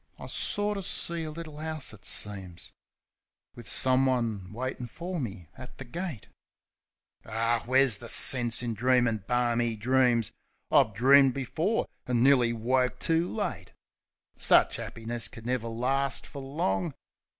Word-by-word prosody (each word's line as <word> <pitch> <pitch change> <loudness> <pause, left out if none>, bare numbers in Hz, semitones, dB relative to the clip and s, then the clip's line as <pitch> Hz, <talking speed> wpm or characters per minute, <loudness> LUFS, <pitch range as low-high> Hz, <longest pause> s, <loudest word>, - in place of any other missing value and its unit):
I - - -10
sorter 205 -1 +1
see 170 -2 -2
a - - -5
little 155 -1 -9
'ouse, 155 -5 -2
it 100 -3 -15
seems, 95 -4 -3 0.8
Wiv 120 - -10
someone 125 -7 +1
waitin' 125 +2 -5
for 175 +7 -6
me 100 - -6
at 130 -1 -12
the 135 - -8
gate... 160 - -6 1.0
Ar, 115 +2 -1
where's 130 -2 +3
the 120 +2 -9
sense 120 -2 +6
in 120 -1 -2
dreamin' 120 -2 +1
barmy 120 -1 0
dreams. 120 0 +1 0.4
I've 110 - +3
dreamed 135 +3 +5
before, 160 - -1 0.2
and 120 -1 +1
nearly 130 -3 +4
woke 125 +2 0
too 165 +2 0
late. - - -5 0.6
Sich - - +3
'appiness 115 +1 -3
could 115 - -12
never 125 -2 -2
last 130 +4 -1
fer 140 - -10
long. 135 - -2
125 Hz, 135 wpm, -28 LUFS, 115-140 Hz, 1.0 s, sense